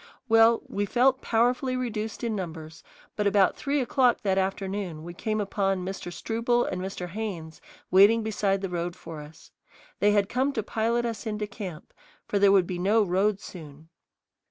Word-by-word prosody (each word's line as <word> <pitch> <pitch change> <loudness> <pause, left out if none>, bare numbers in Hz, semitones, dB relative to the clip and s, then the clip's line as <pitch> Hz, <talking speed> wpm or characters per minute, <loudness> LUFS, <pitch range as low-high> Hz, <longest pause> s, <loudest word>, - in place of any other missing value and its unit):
Well, 225 0 +5
we 205 0 -2
felt 260 +4 +3
powerfully 250 +3 +1
reduced 225 -3 -4
in 230 -2 -1
numbers, 160 -4 -7 0.3
but 210 -1 0
about 200 -1 +3
three 285 +1 -1
o'clock 250 -1 +2
that 195 -2 +2
afternoon 190 -3 -3
we 175 +1 -8
came 215 +4 -2
upon 195 -2 -1
Mr. 190 -2 -5
Struble 235 +5 0
and 185 - -3
Mr. 185 -1 -5
Haynes 175 -6 -6 0.3
waiting 205 +4 +6
beside 200 -3 0
the 195 - -3
road 175 0 -3
for 165 -4 -9
us. 150 +2 -14 0.5
They 205 - +4
had 205 -1 +2
come 260 +5 0
to 220 - -2
pilot 230 +3 0
us 230 0 -4
into 210 -1 -2
camp, 200 -6 -8 0.3
for 205 - 0
there 200 0 +6
would 195 -2 +5
be 175 0 -4
no 210 +4 +3
road 195 +2 +1
soon. 155 -4 -11
200 Hz, 175 wpm, -27 LUFS, 185-225 Hz, 0.5 s, waiting